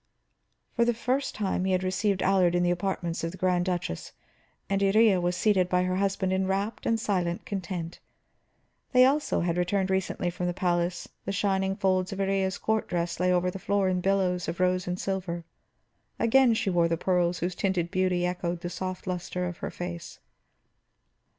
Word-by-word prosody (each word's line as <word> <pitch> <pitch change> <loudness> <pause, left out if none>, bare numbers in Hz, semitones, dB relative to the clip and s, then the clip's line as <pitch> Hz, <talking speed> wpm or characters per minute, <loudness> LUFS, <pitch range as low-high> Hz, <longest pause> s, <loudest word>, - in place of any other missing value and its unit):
For 235 - +3
the 235 0 +2
first 255 +4 -1
time 190 -3 -1
he 190 0 +1
had 185 0 +1
received 190 +1 0
Allard 185 -2 +3
in 175 - +2
the 175 - +2
apartments 175 -2 -2
of 165 - -1
the 185 - -10
Grand 180 -1 +1
Duchess, 175 - -3 0.5
and 195 0 0
Iría 200 -1 +4
was 175 0 0
seated 190 -4 +2
by 180 0 +2
her 185 0 0
husband 195 -1 0
in 190 0 +1
rapt 200 +3 -2
and 225 -1 +2
silent 180 -5 -1
content. 180 -4 -5 0.9
They 255 0 +7
also 290 +3 +1
had 170 0 0
returned 190 +2 0
recently 190 -2 -1
from 180 +1 -3
the 175 - -2
palace; 175 -1 0 0.2
the - - -2
shining 195 -1 0
folds 185 -2 +1
of 195 - -5
Iría's 195 -1 0
court 220 0 0
dress 170 -2 -2
lay 180 0 +2
over 180 0 +2
the 195 - -7
floor 200 0 +1
in 180 -1 0
billows 185 -2 +1
of 170 +2 -4
rose 185 0 +1
and 180 +1 -2
silver; 180 -3 -3 0.7
again 235 0 +4
she 200 - 0
wore 170 -1 +3
the 165 0 0
pearls 180 0 +1
whose 175 +2 -2
tinted 175 -2 -1
beauty 185 -1 +1
echoed 175 -1 -2
the 175 -1 -4
soft 185 0 -5
luster 180 0 -3
of 175 -1 -5
her - - -4
face. 175 -1 -7
185 Hz, 190 wpm, -27 LUFS, 175-195 Hz, 0.9 s, They